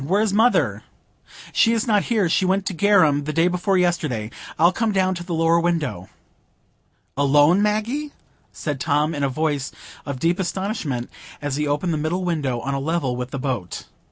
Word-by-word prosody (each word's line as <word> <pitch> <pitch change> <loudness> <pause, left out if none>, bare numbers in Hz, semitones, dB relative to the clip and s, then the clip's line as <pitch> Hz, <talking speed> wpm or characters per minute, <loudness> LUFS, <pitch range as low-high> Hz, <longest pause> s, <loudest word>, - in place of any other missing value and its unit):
Where 190 +9 +1
is 210 -3 0
mother?" 225 +4 +2 0.7
"She 230 - +4
is 225 -2 0
not 210 -4 +2
here; 215 -6 +1
she 175 +3 +1
went 190 +1 +1
to 195 - -2
Garum 165 -6 +3
the 155 - -2
day 165 +3 +2
before 180 +2 +1
yesterday. 155 -11 0 0.3
I'll 170 +3 +5
come 225 +3 0
down 190 -1 +1
to 175 -1 -6
the 175 -1 -3
lower 165 +1 +3
window." 155 - -2 1.1
"Alone, 145 +6 +4
Maggie?" 225 +8 -1 0.4
said 145 -4 -4
Tom, 150 +2 +1
in 145 - -4
a 140 - +1
voice 145 -1 -1 0.3
of 140 -2 -5
deep 170 +6 +1
astonishment, 185 - -3 0.3
as 145 -2 -3
he 150 0 -1
opened 150 +4 0
the - - -1
middle 175 +4 -1
window, 145 -8 -1
on 140 +2 -3
a 135 - -1
level 140 -3 -1
with 125 0 -4
the 135 - -5
boat. 125 -9 -4
165 Hz, 185 wpm, -22 LUFS, 145-190 Hz, 1.1 s, I'll